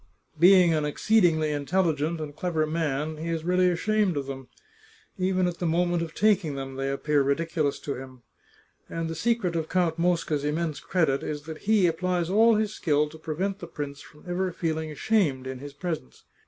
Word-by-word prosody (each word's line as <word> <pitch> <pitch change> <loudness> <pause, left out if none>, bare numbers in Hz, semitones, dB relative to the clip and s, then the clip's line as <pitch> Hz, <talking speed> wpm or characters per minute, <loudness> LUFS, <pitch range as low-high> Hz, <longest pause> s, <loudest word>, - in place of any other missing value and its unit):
Being 180 -1 +7
an 155 -1 +1
exceedingly 160 -1 +2
intelligent 160 +1 0
and 150 -2 -6
clever 160 -1 0
man, 155 -1 -2
he 165 +2 -4
really 180 +3 +2
is 180 - +3
ashamed 205 -1 +1
of 140 - -2
them. 135 -1 -7 0.7
Even 185 0 +1
at 175 -1 -3
the 175 - 0
mo 170 +2 +2
ment 175 -1 0
of 165 -1 -5
taking 195 -9 +2
them 135 -1 -5
they 135 +1 -2
appear 145 +1 +1
ridiculous 150 +1 0
to 140 - -3
him. 130 -2 -10 0.7
And 165 0 -3
the 165 - -3
secret 190 0 0
of 160 -1 -2
Count 170 -3 +1
Mosca's 165 -4 +1
immense 150 0 -1
credit 160 -7 +1
is 150 -1 -4
that 160 0 -8
he 210 -5 +5
ap 165 -1 -2
plies 180 -1 0
all 225 +3 +5
his 215 0 0
skill 150 -4 +1
to 160 - -13
prevent 185 +6 -3
the 170 - -7
prince 145 -3 -6
from 150 - -16
ever 180 +1 -1
feeling 160 -2 -2
ashamed 150 -5 +1
in 130 -1 -5
his 145 +1 -9
presence. 160 - -5
160 Hz, 195 wpm, -26 LUFS, 150-180 Hz, 0.7 s, Being